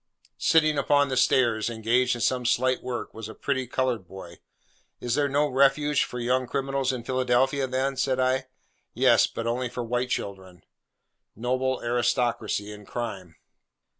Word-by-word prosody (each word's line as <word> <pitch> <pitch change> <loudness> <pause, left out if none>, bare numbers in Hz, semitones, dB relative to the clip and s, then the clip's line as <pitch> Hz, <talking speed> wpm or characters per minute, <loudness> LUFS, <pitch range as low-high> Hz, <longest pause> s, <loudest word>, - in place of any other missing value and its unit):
Sitting 155 -2 +3
upon 145 0 +3
the 130 - -1
stairs, 120 -3 +2
engaged 120 +3 +1
in 120 - -6
some 125 +3 +1
slight 125 +2 +1
work, 125 -1 -5
was 110 -1 -8
a - - -10
pretty 130 -2 -2
coloured 125 -6 -1
boy. 85 -3 -11 0.6
'Is 120 -1 -2
there 145 +1 +1
no 145 +2 +2
refuge 140 +2 +2
for 125 - -7
young 125 +1 0
criminals 135 0 -1
in 125 -2 -5
Philadelphia, 130 +2 +1
then?' 130 +2 -1
said 130 0 0
I. 130 +1 +1 0.5
'Yes, - - +5
but 115 - -6
only 120 +2 -1
for 120 0 -5
white 125 +2 -2
children.' 95 -5 -5 0.7
Noble 130 +3 -1
aristocracy 120 -3 0
in 105 0 -10
crime! 95 -6 -6
125 Hz, 155 wpm, -26 LUFS, 115-130 Hz, 0.7 s, Yes